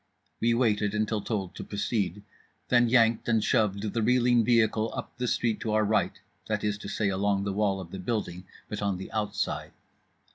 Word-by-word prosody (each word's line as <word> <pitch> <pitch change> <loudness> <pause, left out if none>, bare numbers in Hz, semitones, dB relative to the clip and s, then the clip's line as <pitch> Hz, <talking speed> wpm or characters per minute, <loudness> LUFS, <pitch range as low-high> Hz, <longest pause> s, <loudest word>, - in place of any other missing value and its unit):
We 115 0 +2
waited 105 -4 +1
until 110 0 0
told 100 -4 -3
to - - -7
proceed; 100 -2 -2 0.5
then 120 -1 +4
yanked 115 -1 +3
and 110 -2 +3
shoved 105 -3 +1
the 115 - 0
reeling 120 0 +4
vehicle 110 -1 +2
up - - -6
the 125 - 0
street 115 -2 0
to 110 - -2
our 110 0 +3
right, 105 -2 +1 0.3
that 105 -1 -1
is 105 0 -1
to 100 - -8
say, 100 0 0
along 100 +1 +1
the 100 -1 -2
wall 100 -1 +1
of 85 -3 -9
the 95 - -6
building, 95 -3 -3 0.2
but 105 - -5
on 100 -2 0
the 95 - -8
outside. 105 -1 -2
105 Hz, 190 wpm, -28 LUFS, 100-115 Hz, 0.5 s, then